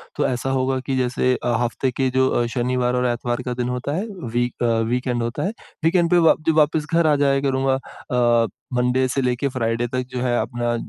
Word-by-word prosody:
तो - - 0
ऐसा 125 +1 -2
होगा 130 0 0
कि 135 - -1
जैसे 125 0 +1
अ, 120 - +1
हफ्ते 125 +2 -1
के 130 +1 0
जो 130 0 +4
अ, 120 - +1
शनिवार 125 0 0
और 125 0 +1
इतवार 120 +1 -3
का 125 - -2
दिन 125 0 -2
होता 125 +2 -3
है 190 +6 -2 0.3
वीक 120 0 -1
अ, - - +3 0.2
वीकेंड 125 -1 -1
होता 115 +1 -3
है। 200 - -1 0.3
वीकेंड 170 +1 +3
पे 175 - +5
वा - - +6
जब 160 - +3
वापस 155 0 +3
घर 165 -1 +4
आ 150 - +4
जाया 140 -1 +3
करूँगा। 135 -1 +1 0.7
अ, - - -4 0.3
मंडे 125 +1 +2
से 135 +2 -1
लेके 125 +2 0
फ्राइडे 120 -2 -1
तक 130 0 0
जो 125 - -3
है 120 -1 +1
अपना 120 0 -1
125 Hz, 220 wpm, -22 LUFS, 120-135 Hz, 0.7 s, वा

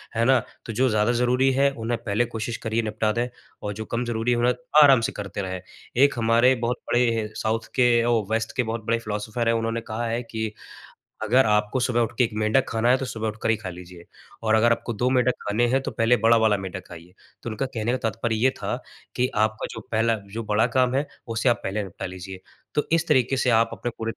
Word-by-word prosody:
है 115 - +2
ना? 130 0 +5 0.3
तो 110 - -5
जो 130 +4 +2
ज़्यादा 110 +1 +2
ज़रूरी 125 +2 +2
है 140 +2 +3
उन्हें 120 -2 -3
पहले 110 +2 +1
कोशिश 115 0 -4
करिए 110 0 0
निपटा 110 0 0
दें 120 +2 0 0.4
और 105 - -3
जो 110 +2 -6
कम 115 +2 -2
ज़रूरी 120 0 -1
है 120 - +2
उन्हें 120 +1 +3 0.3
आराम 135 -4 +6
से 115 - -1
करते 100 -1 -5
रहें। 95 -1 -4 0.4
एक 140 - +4
हमारे 115 +3 +4
बहुत 120 0 -2
बड़े 115 -3 +1
साउथ 110 +1 -1
के 125 -2 +4 0.2
ओ 120 -2 +2
वेस्ट 115 +3 -1
के 125 - +3
बहुत 110 -1 -4
बड़े 115 0 +1
फिलॉसफर 110 +1 -3
है - - +3
उन्होंने 115 0 -1
कहा 115 +1 -4
है 115 +1 -1
कि, 110 -2 -4 0.7
अगर 125 +5 +4
आपको 105 +3 +1
सुबह 120 -1 +1
उठ 115 -1 0
के 125 - +4
1 115 - 0
मेंढक 110 +5 +2
खाना 115 +1 +1
है 130 - +4
तो 135 - -4
सुबह 110 -3 -4
उठकर 110 +1 -3
ही 115 - +4
खा 105 -4 -6
लीजिए 90 -1 -11 0.4
और 110 0 +3
अगर 115 +2 +4
आपको 115 +1 -1
2 120 +4 0
मेंढक 125 -1 +3
खाने 110 +4 +2
हैं 135 +3 +2
तो - - -3
पहले 115 +1 +3
बड़ा 115 0 +6
वाला 110 -2 +3
मेंढक 95 -1 -6
खाइए। 85 +1 -12 0.3
तो - - -4
उनका 110 +5 -2
कहने 120 -3 -2
का 130 - +1
तात्पर्य 115 +1 -2
ये 120 +4 +3
था, - - -2 0.4
कि 125 - +2
आपका 110 +1 0
जो - - -7
पहला 115 +1 +2 0.2
जो 115 +1 -3
बड़ा 105 +2 +2
काम 125 -1 +3
है 140 +2 0 0.2
उसे 115 +2 +1
आप 120 - +1
पहले 105 +2 -2
निपटा 95 -3 -7
लीजिए। 95 +1 -8 0.4
तो 150 - +2
इस 165 0 +2
तरीके 135 -3 +2
से 130 - +1
आप 115 -1 +4
अपने 120 - -4
पूरे 115 0 -3
115 Hz, 235 wpm, -24 LUFS, 110-120 Hz, 0.7 s, आराम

